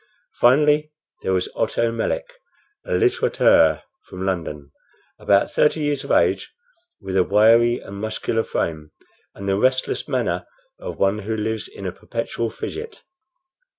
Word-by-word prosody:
Finally, 150 +4 +4 0.3
there - - -1
was 90 -1 +1
Otto 115 0 0
Melick, 310 - -2 0.6
a - - -2
litterateur 390 -3 +3 0.2
from 95 +1 -6
London, 75 -6 -3 0.5
about 100 0 +2
thirty 150 +1 +2
years 145 -2 -1
of - - -9
age, - - +2 0.5
with 95 -2 -5
a 95 - +5
wiry 115 +4 +4
and 100 - -10
muscular 110 +1 -2
frame, 80 -2 -3 0.5
and 100 - -7
the 95 0 +1
restless 130 +2 0
manner - - -1 0.3
of - - -7
one 100 +2 +1
who 110 +2 -3
lives 110 0 -2
in 100 - -10
a 90 - -2
perpetual 115 +3 -4
fidget. 435 - -7
110 Hz, 140 wpm, -22 LUFS, 95-130 Hz, 0.6 s, a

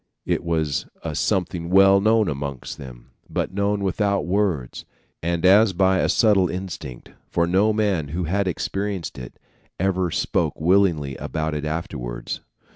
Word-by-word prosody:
It - - 0
was 80 -4 -1 0.2
a - - -3
something 90 -2 -1
well 95 +1 +6
known 110 0 +3
amongst 70 -3 -5
them, 65 -1 -11 0.2
but - - -2
known 100 +1 0
without 100 +1 0
words, 90 -9 -1 0.4
and 85 +1 -1
as 100 +2 +6
by 95 +1 +3
a - - +1
subtle 100 -5 +4
instinct, 80 -9 -7 0.2
for 85 - +1
no 95 +5 +3
man 100 -8 0
who 85 +5 -3
had 95 +4 0
experienced 95 +1 -3
it 60 - -10 0.4
ever 95 -1 +1
spoke - - -1
willingly 85 -5 +2
about 80 0 -3
it 75 0 -3
afterwards. - - -4
90 Hz, 145 wpm, -23 LUFS, 75-100 Hz, 0.4 s, well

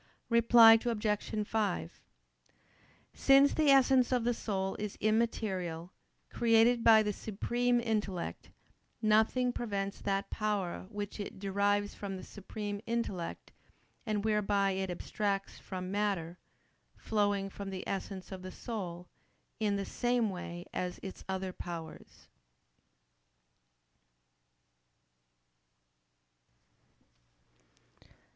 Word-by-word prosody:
Reply 230 -1 +8
Obj. 210 -2 -1
5: 85 - -2 1.1
Since 275 +1 +5
the 310 -2 +3
essence 265 -2 +5
of 250 -2 +2
the 240 +1 +2
soul 195 -4 -2
is 210 -1 -4
immaterial, 190 -6 -1 0.4
created 230 0 +4
by 220 -1 +7
the 210 -1 -1
supreme 240 +4 0
intellect, 210 -6 -3 0.5
nothing 220 +3 +3
prevents 200 -4 -3
that 195 0 -1
power 205 -4 -2
which 205 -1 -6
it 205 - -6
derives 205 +1 0
from 195 -2 -5
the - - -9
supreme 205 0 -6
intellect, 215 -7 -3 0.5
and 215 -3 -2
whereby 205 -2 +2
it 190 0 -2
abstracts 195 +2 -3
from 185 -1 -6
matter, 195 -5 -1 0.6
flowing 205 -2 0
from 195 0 -7
the 190 -1 -6
essence 195 -1 -5
of 190 -1 -6
the 185 0 -7
soul, 180 -7 -6 0.5
in 210 -2 +1
the 200 0 -2
same 240 -2 0
way 175 -1 -7
as 180 -1 -3
its 190 - -8
other 190 -1 -3
powers. 170 -3 -9
205 Hz, 100 wpm, -32 LUFS, 190-225 Hz, 1.1 s, Reply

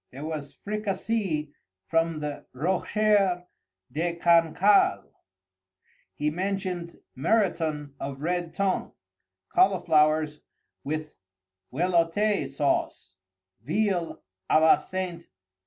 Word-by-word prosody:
There 140 +4 -8
was 150 -3 -6
Fricassée 200 -6 -2 0.3
from 165 +1 0
the 150 -1 -5
Rocher 190 +4 +1 0.5
de 170 +5 -1
Cancale. 170 - +3 1.0
He 150 0 0
mentioned 185 -1 -3 0.2
Muriton 160 - 0
of 135 0 -5
red 175 0 -1
tongue; 195 -1 -1 0.6
cauliflowers 155 - +3 0.4
with 155 +1 -4 0.6
velouté 170 +2 +1
sauce; 140 -8 -1 0.5
veal 180 0 -1 0.3
à - - +5
la 160 0 +6
St. 180 -3 -5
170 Hz, 85 wpm, -27 LUFS, 150-190 Hz, 1.0 s, la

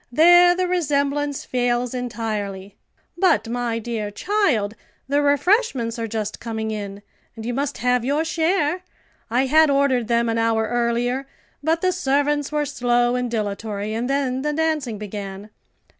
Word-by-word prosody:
there 350 +5 +7
the 365 0 0
resemblance 290 -4 0
fails 245 -1 0
entirely. 215 -5 -4 0.4
But, 225 - +3
my 240 -1 -2
dear 225 -2 -3
child, 245 - 0 0.3
the 285 +2 +2
refreshments 285 - +1
are 225 - -2
just 215 -1 -4
coming 220 -1 -4
in, 200 -1 -6 0.3
and 225 -1 -8
you 245 - -2
must 275 +1 -2
have 250 +1 +1
your 290 +5 0
share. 325 +1 0 0.5
I 250 +4 +2
had 310 +3 +5
ordered 275 -4 +2
them 235 0 +2
an 230 0 0
hour 225 -1 +2
earlier, 240 +3 0 0.3
but 325 +3 +1
the 370 - +2
servants 290 -3 0
were 300 -1 0
slow 245 -2 +1
and 250 -1 -1
dilatory, 210 -1 -3
and 235 +3 -2
then 265 -2 0
the 300 +1 -1
dancing 305 -7 -1
began. 205 0 -7
245 Hz, 150 wpm, -22 LUFS, 225-290 Hz, 0.5 s, there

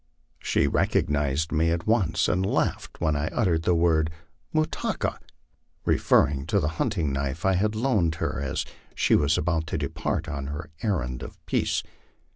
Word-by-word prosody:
She - - +1
recognized 75 +1 +1
me 80 +1 +2
at 85 0 -1
once, 105 -7 +2
and 95 - +1
laughed 95 - -1
when 80 -3 +1
I 75 +1 -1
uttered 85 -5 +1
the 90 +1 +2
word 80 -2 +3 0.2
' - - -42
Mutah 155 0 0
ka,'' - - -2 0.7
referring 70 0 +3
to 100 +3 +2
the 75 -4 0
hunting 85 - 0
knife 70 +3 -2
I 95 - +4
had 105 +4 +1
loaned 110 -9 +1
her 80 - -2
as 65 -2 -2 0.3
she - - +2
was 75 +1 +4
about 80 0 0
to - - -2
depart - - -2
on 70 -1 -4
her 75 +2 -6
errand 65 - -1
of - - -8
peace. - - 0
80 Hz, 170 wpm, -26 LUFS, 75-95 Hz, 0.7 s, I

